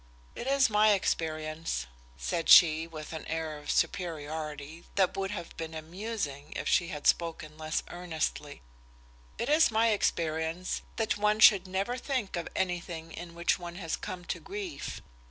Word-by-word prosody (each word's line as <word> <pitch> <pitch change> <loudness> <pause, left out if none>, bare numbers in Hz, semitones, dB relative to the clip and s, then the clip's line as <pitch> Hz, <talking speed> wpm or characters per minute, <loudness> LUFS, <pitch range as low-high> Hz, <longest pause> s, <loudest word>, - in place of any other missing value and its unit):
"It 245 - -6
is 275 -1 +4
my 210 0 +5
experience," 155 - -1 0.3
said 65 - -2
she 160 -1 +8
with 155 -1 -8
an 160 - -5
air 160 -1 -3
of 145 - -11
superiority 155 -2 -2
that 190 -2 +3
would 195 0 -2
have 200 -4 -6
been 160 0 -5
amusing 160 -3 -5
if - - -3
she 175 - +3
had 150 -4 -6
spoken 160 -2 +1
less 155 0 -2
earnestly 160 - -4 0.7
"it - - -2
is 310 +2 +5
my 225 +1 +3
experience 165 -3 0
that 225 -2 0
one 210 +1 +2
should 200 -4 +7
never 195 +7 -1
think 255 -8 -2
of 170 -1 -3
anything 175 -3 -2
in 170 0 -8
which 170 +2 +1
one 175 -1 -7
has 170 -3 -2
come 180 -1 -7
to 170 - -3
grief. 185 -4 -6
170 Hz, 155 wpm, -30 LUFS, 155-195 Hz, 0.7 s, she